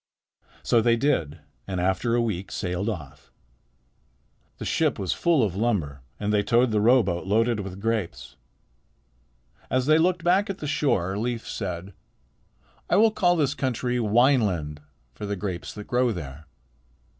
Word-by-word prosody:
So 115 - +3
they 115 +1 +3
did, 85 - 0 0.3
and 95 -2 -3
after 95 +6 +1
a 120 - +2
week 95 -4 -3
sailed 90 +2 -2
off. 80 -11 -8 1.3
The - - -6
ship - - +1
was 95 -3 -1
full 165 -7 +2
of 95 -4 -1
lumber, 95 - -1 0.2
and 105 0 -1
they 105 - +3
towed 120 +3 +2
the 105 -1 +1
rowboat 105 -7 +3
loaded 115 +2 +2
with 95 -1 -6
grapes. 110 -4 -3 1.3
As 130 0 +1
they 155 +2 +5
looked 180 +1 +1
back 185 +4 +3
at 195 - -3
the 150 - -7
shore, 105 - 0
Leif 115 0 -3
said: 90 +1 -5 1.0
"I - - +3
will 220 +2 +5
call 175 -4 +2
this 145 -4 +1
country 125 -3 -1
Wineland 105 - +2 0.3
for 105 - -7
the 100 - -2
grapes 95 -2 -5
that 105 -1 -8
grow 125 0 +1
there." 75 -5 -7
110 Hz, 155 wpm, -25 LUFS, 95-125 Hz, 1.3 s, they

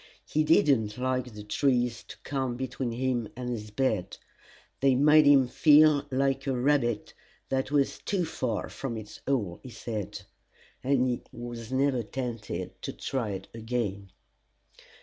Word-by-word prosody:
He 155 - +1
did 155 0 +4
not 110 -6 +2
like 130 -1 -1
the 105 - -8
trees 120 +1 +1
to - - -10
come 130 -3 -2
between 130 -1 -3
him 120 -1 -1
and 125 0 -4
his 105 -3 -5
bed: 105 -5 -1 0.6
they 135 -1 +4
made 150 +2 +6
him 135 -3 +6
feel 150 +2 +5
like 135 +1 0
a 130 -2 0
rabbit 120 -5 +1 0.4
that 130 0 0
was 140 -1 +1
too 190 -4 -1
far 130 -9 -2
from 120 -4 -5
its 110 -1 -9
hole, 105 -11 0
he 130 - -10
said; 110 -3 -5 0.6
and 130 -1 +2
he 125 -1 -1
was 120 0 -7
never 130 -1 +2
tempted 115 -6 -5
to - - -4
try 130 -5 -3
it 95 0 -6
again. 110 -4 -3
125 Hz, 150 wpm, -28 LUFS, 115-135 Hz, 0.6 s, made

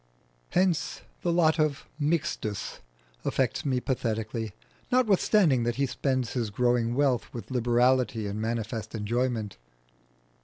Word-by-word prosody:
Hence 180 -3 +1 0.2
the 175 - +1
lot 165 -2 +3
of 150 -2 +1
Mixtus 150 - -1 0.4
affects - - 0
me 130 -3 +1
pathetically, 110 -3 -2 0.4
notwithstanding 205 - +4
that 120 0 0
he 140 - +1
spends 130 -2 -1
his 120 -4 -1
growing 120 +2 +1
wealth 135 -3 +1
with 120 - -7
liberality 120 -2 +2
and 100 +1 -3
manifest 110 0 -3
enjoyment. 115 - -1
125 Hz, 115 wpm, -28 LUFS, 115-145 Hz, 0.4 s, notwithstanding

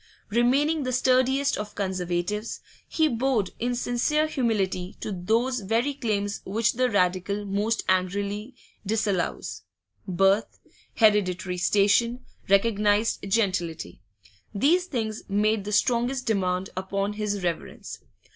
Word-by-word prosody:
Remaining 275 +7 +2
the 255 -2 -2
sturdiest 260 +2 +2
of 210 0 -6
Conservatives, 185 +2 -2 0.3
he 315 -1 +2
bowed 240 -6 0
in 245 +1 -1
sincere 250 +6 +1
humility 205 -10 -1
to - - -4
those 225 +8 0
very 225 +7 0
claims 205 -7 -2
which 215 +3 0
the 255 +1 +1
Radical 200 0 0
most 205 +3 -1
angrily 200 +5 -1 0.3
disallows: 195 - -1 0.5
birth, 195 +3 +2 0.4
hereditary 185 -4 +2
station, 210 +6 +2 0.2
recognised 205 +1 +3
gentility 175 - -1 0.5
these 335 - +3
things 225 -9 -3
made 210 +1 +1
the 210 - -4
strongest 245 +4 +1
demand 185 -3 0
upon 195 +2 -2
his 205 -2 -3
reverence. 170 -2 -4
210 Hz, 110 wpm, -26 LUFS, 195-240 Hz, 0.5 s, recognised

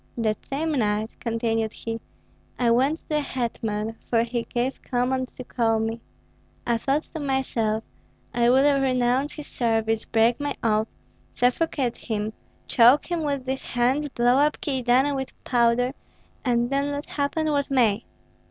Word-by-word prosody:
"That 220 -2 -1
same 310 +4 -1
night," 215 -5 0
continued 225 -1 -1
he, 225 0 -5 0.6
"I 240 -2 +2
went 270 +6 +3
to - - -28
the 300 -1 +2
hetman, 225 -4 -3
for 230 -1 +3
he 235 0 -3
gave 245 +2 -1
command 255 +1 0
to 255 - -8
call 230 -2 +1
me. 225 +1 -2 0.6
I 235 -1 +1
thought 275 +6 0
to 320 - -4
myself, 250 -6 0 0.5
'I 240 -1 +3
will 275 +2 +4
renounce 255 +1 +1
his 300 - -7
service, 225 -2 0
break 230 +2 +2
my 290 -1 -2
oath, 215 -1 +2 0.5
suffocate 250 0 +1
him, 215 -1 -3 0.3
choke 255 +8 +5
him 340 -1 0
with 280 -3 -2
these 265 0 -2
hands, 260 +5 0
blow 245 0 +3
up 300 +1 +2
Kyedani 265 +1 +2
with 265 -1 -4
powder, 245 +1 +2 0.5
and 240 -1 +1
then 280 +1 0
let 285 +1 -4
happen 305 +2 -1
what 285 -1 0
may.' 235 -5 +2
245 Hz, 150 wpm, -25 LUFS, 230-275 Hz, 0.6 s, choke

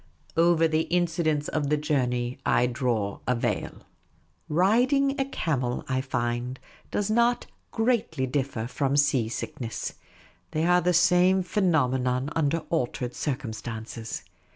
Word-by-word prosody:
Over 165 0 +4
the 160 0 0
incidents 165 -4 +1
of 145 -2 -1
the 150 - +3
journey 125 -4 -1
I 125 - +3
draw 120 -5 -1
a 125 - +2
veil. 115 - -2 0.7
Riding 255 - +3
a - - +1
camel, 135 - -2
I 130 -2 0
find, 125 0 -2 0.3
does 205 +1 -1
not 235 +2 +2 0.2
greatly 225 - 0
differ 130 -3 -2
from 140 +3 0
sea 130 -5 +3
sickness. 115 0 -4 0.6
They 155 +1 +1
are 180 +1 +4
the 180 +1 +2
same 180 +2 +4
phenomenon 130 -8 +1
under 160 +1 +1
altered 125 -5 -1
circumstances. 115 -4 -5
145 Hz, 125 wpm, -26 LUFS, 125-175 Hz, 0.7 s, Over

